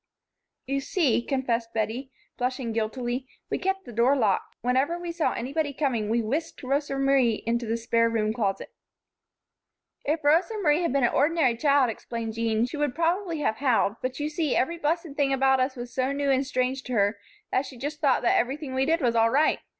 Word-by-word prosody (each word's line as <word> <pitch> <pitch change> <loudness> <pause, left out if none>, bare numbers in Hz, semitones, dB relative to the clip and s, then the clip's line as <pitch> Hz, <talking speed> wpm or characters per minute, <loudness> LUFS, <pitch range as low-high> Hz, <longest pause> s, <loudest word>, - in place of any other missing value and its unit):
"You 275 +1 -1
see," 275 -4 +1
confessed 235 -3 -2
Bettie, 225 +5 -2 0.2
flushing 250 -1 -2
guiltily, 240 +3 -2 0.2
"we - - 0
kept 385 0 -1
the 240 - -10
door 240 +5 +3
locked. 215 -8 0
Whenever 260 +7 +1
we 345 -1 -5
saw 335 -2 0
anybody 285 +4 -2
coming 245 -7 -1
we 230 +1 +1
whisked 290 +10 -3
Rosa 275 +1 -1
Marie 270 -5 +2
into 235 0 -1
the 225 +1 0
spare 230 0 +2
room 215 -1 0
closet." 205 -5 -2 1.3
"If 310 +2 -1
Rosa 330 +9 +3
Marie 300 +1 +3
had 340 - 0
been 275 0 +1
an 240 - +2
ordinary 290 -4 +3
child," 280 -1 +3
explained 225 0 -5
Jean, 225 0 +1
"she 250 +5 -6
would 290 -4 -1
probably 335 0 0
have 220 -6 0
howled; 240 -5 +1
but 255 +2 -3
you 295 - -1
see, 305 -2 -1
every 335 +6 0
blessed 330 +2 -1
thing 280 -2 +1
about 265 0 +3
us 260 +1 0
was 240 -1 -7
so 260 +1 0
new 280 0 0
and 265 0 +1
strange 255 0 -1
to 250 - -4
her 205 -1 +1 0.3
that 265 +1 +1
she 260 - -11
just 290 +5 -5
thought 275 -5 +3
that 235 - +3
everything 270 +2 -2
we 265 +1 +1
did 330 +1 +2
was 240 -3 +1
all 225 0 +4
right. 295 +6 +3
260 Hz, 200 wpm, -26 LUFS, 235-295 Hz, 1.3 s, all